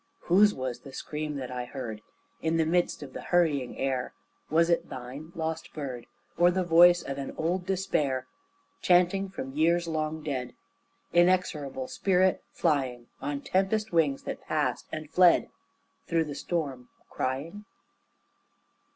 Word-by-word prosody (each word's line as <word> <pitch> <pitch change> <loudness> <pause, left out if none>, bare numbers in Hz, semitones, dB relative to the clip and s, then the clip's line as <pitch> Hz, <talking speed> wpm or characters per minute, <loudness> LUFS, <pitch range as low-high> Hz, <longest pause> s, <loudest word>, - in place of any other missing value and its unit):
Whose 205 +4 +5
was 130 -5 -4
the 135 - -12
scream 150 +1 -4
that 130 -2 -5
I 125 -1 -3
heard 120 -5 -6 0.4
In 165 0 +1
the 160 - +3
midst 175 -1 +1
of 135 -2 -10
the - - -6
hurrying 155 -8 +1
air? 130 -2 -2 0.3
Was 165 +2 +4
it 170 -1 +1
thine, 130 +5 -8
lost 160 -1 -4
bird, 130 -6 -5 0.3
Or 175 0 +7
the 185 +1 +1
voice 175 +1 +6
of 135 0 -5
an 135 - -5
old 180 +3 -1
despair 150 -9 0 0.6
Chanting 180 +2 +3
from 135 -8 -6
years 170 +3 +2
long 155 -1 -2
dead, 130 -4 -3 0.6
Inexorable 170 -7 +2
spirit 185 -1 +2
flying 130 -7 0
On 145 -1 -3
tempest 205 +5 0
wings 155 -5 +2
that - - -5
passed 145 -5 -1
and 155 -1 -5
fled 180 +2 +4 0.6
Through 165 -1 +1
the 150 - -5
storm 140 -5 -3 0.2
crying? 155 +11 -3
155 Hz, 140 wpm, -28 LUFS, 135-175 Hz, 0.6 s, Or